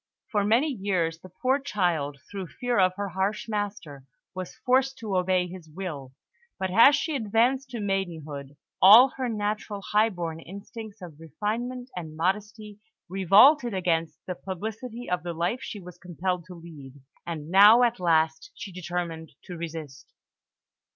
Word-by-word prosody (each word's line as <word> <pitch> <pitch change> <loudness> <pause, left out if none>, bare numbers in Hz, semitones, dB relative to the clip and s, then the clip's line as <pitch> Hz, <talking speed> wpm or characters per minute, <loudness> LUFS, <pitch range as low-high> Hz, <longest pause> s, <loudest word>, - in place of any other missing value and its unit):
For 205 -3 +1
many 230 +9 +3
years 185 - -1
the 185 - -13
poor 255 +9 0
child, 175 - -1
through 195 -3 -5
fear 245 +5 -1
of 185 -1 +3
her 200 0 -3
harsh 190 +5 -2
master, 205 -10 -4 0.3
was 185 -1 -7
forced 265 +1 +1
to 215 -4 -4
obey 185 0 +2
his 180 -2 -10
will; 150 -6 -7 0.4
but 190 -2 -2
as 235 +8 +7
she 315 -2 -2
advanced 245 +3 +1
to 240 -3 -5
maidenhood, 160 -8 -4 0.2
all 225 +8 +9
her 255 -1 -4
natural 210 -1 -3
high 215 +2 +4
born 170 -5 -5
instincts 200 +3 -10
of 160 -4 -11
refinement 230 - -4
and 160 -3 -7
modesty 210 +4 -2 0.3
revolted 210 - +5
against 165 -4 0
the 180 - -3
publicity 220 +7 -6
of 180 -3 -1
the 170 +1 -5
life 175 +10 -1
she 210 - -6
was 180 -1 -12
compelled 180 0 -3
to 180 0 -11
lead, 155 -6 -12 0.3
and 160 -1 -5
now, 210 +5 +8
at 235 -5 +1
last, 160 - +1
she 210 -4 -8
determined 175 -2 -5
to 180 - -8
resist. 160 -5 -8
190 Hz, 155 wpm, -26 LUFS, 170-220 Hz, 0.4 s, all